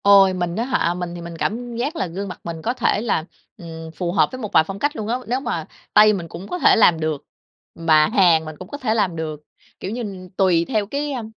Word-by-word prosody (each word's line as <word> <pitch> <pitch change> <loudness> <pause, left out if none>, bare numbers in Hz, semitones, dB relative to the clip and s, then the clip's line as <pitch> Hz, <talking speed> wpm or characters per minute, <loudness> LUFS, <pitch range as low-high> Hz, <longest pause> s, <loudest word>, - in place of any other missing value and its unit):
Ôi, 195 -1 +7
mình 175 -1 -2
á 225 - 0
hả, 245 -10 +1
mình 175 -1 -5
thì 175 - -7
mình 170 0 -8
cảm 235 +6 -3
giác 270 +8 -2
là 190 - -1
gương 190 +4 -5
mặt 180 - -8
mình 165 -1 -6
có 235 - -1
thể 210 - +1
là, 210 -8 0 0.3
ừm, 165 -3 -9
phù 175 -2 -2
hợp 190 - +3
với 255 0 -7
một 215 - -5
vài - - +6
phong 195 0 -6
cách 290 +5 0
luôn 210 - -4
á. 240 +2 0
Nếu 250 +3 0
mà 270 - -3 0.3
Tây 215 0 +7
mình 175 -4 -4
cũng 175 +4 -9
có 360 - -4
thể - - +6
làm 175 -7 +5
được, 155 -3 -2 0.5
mà 155 -2 +4
Hàn 175 -7 +4
mình 155 0 -7
cũng 185 - -8
có 285 - -6
thể 250 -6 0
làm 200 -6 +1
được, 155 -2 -5 0.4
kiểu 190 - -5
như, 200 -6 -6
tùy 180 -4 +3
theo 215 -5 +1
cái 285 +7 -3
à, 250 -4 -3
190 Hz, 260 wpm, -21 LUFS, 170-230 Hz, 0.5 s, Ôi